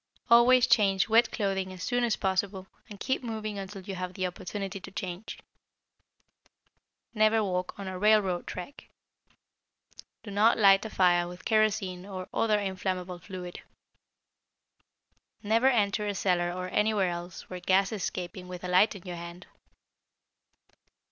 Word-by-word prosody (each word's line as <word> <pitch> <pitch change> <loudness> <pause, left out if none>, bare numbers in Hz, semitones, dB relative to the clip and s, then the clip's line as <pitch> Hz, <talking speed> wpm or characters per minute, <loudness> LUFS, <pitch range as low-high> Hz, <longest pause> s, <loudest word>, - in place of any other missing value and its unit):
Always 240 +1 +7
change 195 -5 +3
wet 230 +1 +4
clothing 195 -3 -2
as 185 -1 -8
soon 245 -1 0
as 235 -2 +1
possible, 190 0 -1 0.2
and 205 -2 -10
keep 260 +4 -1
moving 215 -4 -5
until 195 0 -8
you 195 +1 -6
have 185 +1 -6
opportunity 190 +2 -4
to - - -10
change. 185 +2 -6 1.8
Never 215 0 +3
walk 180 -2 -3
on 200 -1 -7
a 185 -1 -5
railroad 210 -4 +2
track. 185 +10 -8 1.3
Do 205 - -8
not 210 +3 +4
light 195 -3 +6
a - - -4
fire 175 -3 +3
with 180 +1 -11
kerosene 215 -4 +1
or 185 -2 -6
other 215 -2 +2
inflammable 185 -2 -3
fluid. 180 -1 -8 1.8
Never 225 +5 +3
enter 210 -4 +2
a 205 - -2
cellar 175 -2 +1
or 180 +1 -4
anywhere 210 -2 +1
else 175 0 -7
where 180 - -7
gas 190 +3 +2
is 215 -3 -4
escaping 180 0 -5
with 180 0 -8
a - - -3
light 185 +5 +4
in 190 - -10
your 180 -2 -6
hand. 170 +1 -9
195 Hz, 145 wpm, -28 LUFS, 180-215 Hz, 1.8 s, Always